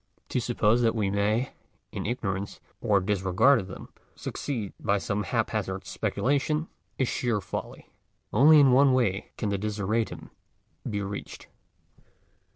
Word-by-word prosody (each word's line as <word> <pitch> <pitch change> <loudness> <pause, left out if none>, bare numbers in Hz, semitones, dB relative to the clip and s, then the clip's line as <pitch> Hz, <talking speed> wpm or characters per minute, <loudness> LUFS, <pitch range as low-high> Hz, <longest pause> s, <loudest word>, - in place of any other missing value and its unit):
To 125 - 0
suppose 115 -1 +2
that 115 -1 +2
we 100 -3 0
may, 105 +5 +1 0.4
in - - -4
ignorance 100 -4 -3 0.2
or 100 -2 +3
disregard 95 +7 +3
of 95 - -6
them, 95 - -9 0.3
succeed 115 -9 -4
by 100 -1 +1
some 100 +1 -2
hap 95 - -1
hazard - - -3
speculation, 150 +4 0 0.3
is 130 - +1
sheer 120 -4 0
folly. 95 - -7 0.4
Only 150 +7 +7
in 140 -3 +6
one 135 +1 +5
way 110 -6 +1
can 105 - -1
the 100 -1 -1
desideratum 105 +2 -2 0.6
be 105 -1 -2
reached. 100 +1 -7
105 Hz, 140 wpm, -27 LUFS, 100-125 Hz, 0.6 s, Only